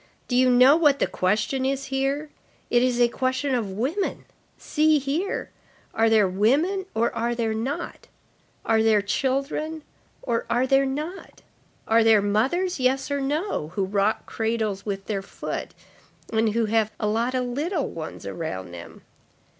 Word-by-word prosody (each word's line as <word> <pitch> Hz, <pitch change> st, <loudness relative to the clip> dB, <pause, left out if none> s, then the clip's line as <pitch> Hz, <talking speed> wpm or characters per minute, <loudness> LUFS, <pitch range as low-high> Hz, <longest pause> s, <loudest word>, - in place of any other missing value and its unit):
Do 245 Hz, -, -1 dB
you 255 Hz, 0 st, +5 dB
know 250 Hz, +3 st, +7 dB
what 295 Hz, -4 st, +4 dB
the -, -, +2 dB
question 215 Hz, +8 st, 0 dB
is 275 Hz, +1 st, -1 dB
here? 275 Hz, +3 st, -1 dB, 0.4 s
It 240 Hz, -, +4 dB
is 250 Hz, -1 st, +1 dB
a 240 Hz, -, +6 dB
question 260 Hz, +3 st, -1 dB
of 230 Hz, -5 st, -1 dB
women. 280 Hz, -, -2 dB, 0.3 s
See 310 Hz, 0 st, +2 dB
here. 295 Hz, +8 st, -2 dB, 0.4 s
Are 225 Hz, 0 st, +3 dB
there 215 Hz, -3 st, +4 dB
women 290 Hz, -, +1 dB
or 230 Hz, +1 st, +1 dB
are 235 Hz, +1 st, -1 dB
there 225 Hz, -2 st, -1 dB
not? 240 Hz, +6 st, -4 dB, 0.6 s
Are 220 Hz, 0 st, +3 dB
there 220 Hz, -2 st, +3 dB
children 275 Hz, +7 st, -2 dB, 0.4 s
or 235 Hz, -3 st, -1 dB
are 245 Hz, +2 st, +2 dB
there 270 Hz, +1 st, +3 dB
not? 305 Hz, +8 st, -6 dB, 0.4 s
Are 225 Hz, +1 st, +4 dB
there 225 Hz, -1 st, +6 dB
mothers, 270 Hz, -, 0 dB
yes 265 Hz, +2 st, +1 dB
or 285 Hz, 0 st, 0 dB
no, 295 Hz, -, -1 dB
who 195 Hz, -, +1 dB
rock 200 Hz, +2 st, 0 dB
cradles 220 Hz, -3 st, -2 dB
with 195 Hz, -1 st, -3 dB
their 200 Hz, -3 st, -2 dB
foot 195 Hz, -, -6 dB, 0.6 s
and 220 Hz, -1 st, +2 dB
who 230 Hz, 0 st, +1 dB
have 220 Hz, 0 st, +1 dB
a -, -, -1 dB
lot 230 Hz, +4 st, 0 dB
of 250 Hz, -1 st, 0 dB
little 295 Hz, +6 st, -2 dB
ones 160 Hz, -1 st, -7 dB
around 95 Hz, -, -5 dB
them? 85 Hz, -1 st, -11 dB
245 Hz, 160 wpm, -24 LUFS, 220-275 Hz, 0.6 s, know